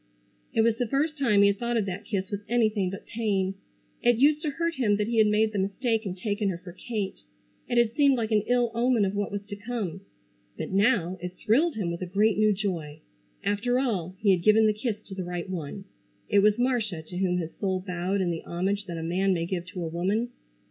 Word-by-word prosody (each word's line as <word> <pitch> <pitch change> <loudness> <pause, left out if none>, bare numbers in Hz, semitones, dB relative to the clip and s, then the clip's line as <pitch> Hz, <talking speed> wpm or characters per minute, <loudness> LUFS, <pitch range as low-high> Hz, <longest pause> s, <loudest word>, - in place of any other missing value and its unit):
It 225 - +2
was 225 0 +3
the 245 - 0
first 295 +6 0
time 235 -9 +3
he 200 - +6
had 200 0 -1
thought 240 0 0
of 215 - +1
that 195 +2 -5
kiss 195 -3 -3
with 205 0 -3
anything 215 -5 +2
but 195 +2 -8
pain. 200 -4 -1 0.5
It 240 0 +4
used 295 +4 +4
to 310 - -1
hurt 335 +4 -1
him 225 -9 +2
that 210 - 0
he 230 -1 +1
had 215 - +6
made 215 +1 +2
the 205 - -2
mistake 220 +3 0
and 185 0 -4
taken 205 +1 -1
her 180 - -2
for 180 0 -11
Kate. 205 +1 -4 0.5
It 240 - 0
had 235 -1 +3
seemed 280 -3 +4
like 225 -1 -2
an 215 -1 +4
ill 245 -1 +2
omen 235 -2 +2
of 190 - -1
what 205 0 -2
was 205 0 -4
to 205 0 -7
come. 205 -4 -4 0.6
But - - -4
now, 195 -3 +2
it 180 0 -6
thrilled 295 +10 +2
him 190 -6 -2
with 170 - -5
a 185 - -3
great 205 +4 +2
new 215 0 +5
joy. 180 -7 -3 0.4
After 220 +5 +1
all 195 -9 -1
he 200 0 +3
had 180 -2 +2
given 215 +4 +5
the 215 - +4
kiss 215 0 -2
to 195 - -9
the 190 -1 -4
right 175 0 -4
one. 185 +1 -5 0.4
It 205 - +4
was 210 +1 +4
Marcia 230 -9 0
to 175 +3 -8
whom 180 -2 +1
his 165 -2 -4
soul 190 -2 -1
bowed 185 +1 -1
in 175 -2 +1
the 165 - -3
homage 195 +3 -2
that 170 -2 -5
a 165 - -4
man 185 +3 +1
may 165 -1 -1
give 175 0 -3
to 185 -1 -5
a - - -2
woman. 195 +8 -1
205 Hz, 240 wpm, -27 LUFS, 185-230 Hz, 0.6 s, he